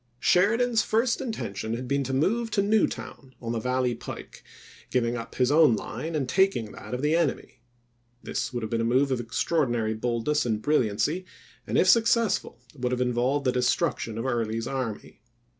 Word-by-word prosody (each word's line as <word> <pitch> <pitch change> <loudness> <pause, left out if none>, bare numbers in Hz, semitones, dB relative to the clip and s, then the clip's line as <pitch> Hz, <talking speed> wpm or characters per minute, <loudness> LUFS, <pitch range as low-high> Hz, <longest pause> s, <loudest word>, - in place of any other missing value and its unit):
Sheridan's 225 - +3
first 230 +3 +1
intention 115 - -4
had 125 +2 -5
been 140 +1 0
to 135 - -3
move 220 - +1
to 200 - +4
Newtown, 200 - -1
on 115 -1 -4
the 115 - -1
valley 125 +1 0
pike, 115 - -9 0.5
giving 120 -1 0
up 115 -1 -7
his 125 +1 +2
own 150 -6 +6
line, 160 +9 -5
and 140 -4 -1
taking 185 - +1
that - - -7
of 125 - -5
the 150 +2 +3
enemy. 150 -6 -1 0.6
This - - -3
would 120 -2 -4
have 110 - -4
been 115 0 0
a - - 0
move 130 +4 +2
of 130 - 0
extraordinary 120 -2 0
boldness 120 +6 0
and 110 -3 -1
brilliancy, 145 - 0 0.4
and - - 0
if - - +4
successful 230 - +3 0.2
would 125 -2 -2
have 125 - -1
involved 125 +3 0
the 125 - +3
destruction 125 -2 0
of 115 - -3
Early's 115 -3 -1
army. 120 -6 -5
130 Hz, 175 wpm, -26 LUFS, 115-165 Hz, 0.6 s, own